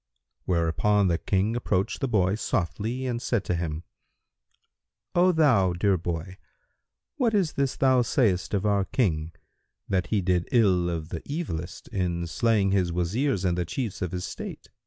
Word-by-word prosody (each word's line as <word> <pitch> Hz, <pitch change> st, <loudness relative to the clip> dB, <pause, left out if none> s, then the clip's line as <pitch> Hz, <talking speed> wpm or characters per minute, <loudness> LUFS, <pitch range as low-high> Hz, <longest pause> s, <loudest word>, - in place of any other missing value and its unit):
Hereupon 95 Hz, +4 st, +2 dB
the 85 Hz, -, +1 dB
King 100 Hz, +4 st, 0 dB
approached 100 Hz, -5 st, -1 dB
the 135 Hz, -, 0 dB
boy 95 Hz, -5 st, +2 dB
softly 110 Hz, +5 st, -2 dB
and 120 Hz, -2 st, -2 dB
said 120 Hz, -6 st, 0 dB
to 90 Hz, -, -2 dB
him, 85 Hz, -1 st, -3 dB, 1.3 s
"O 180 Hz, +1 st, +5 dB
thou 130 Hz, -, +3 dB
dear 95 Hz, +2 st, +2 dB
boy, 85 Hz, +2 st, -4 dB, 0.8 s
what 235 Hz, -6 st, +2 dB
is 185 Hz, -6 st, +1 dB
this 140 Hz, -2 st, 0 dB
thou 130 Hz, -2 st, +4 dB
sayest 105 Hz, -7 st, +1 dB
of 100 Hz, +1 st, -1 dB
our 100 Hz, -2 st, +2 dB
King, 80 Hz, -, 0 dB, 0.6 s
that 90 Hz, -3 st, 0 dB
he 105 Hz, -, +1 dB
did 90 Hz, -2 st, 0 dB
ill 95 Hz, -7 st, +3 dB
of 80 Hz, -2 st, -4 dB
the 85 Hz, -, -5 dB
evilest 115 Hz, -, -4 dB
in 85 Hz, -3 st, -1 dB
slaying 105 Hz, +1 st, +1 dB
his 95 Hz, -3 st, +1 dB
Wazirs 95 Hz, -, 0 dB
and 90 Hz, -1 st, +2 dB
the 90 Hz, -, 0 dB
Chiefs 110 Hz, -, -4 dB
of 90 Hz, -3 st, -2 dB
his 90 Hz, -1 st, -3 dB
State? -, -, -7 dB
95 Hz, 160 wpm, -26 LUFS, 85-120 Hz, 1.3 s, O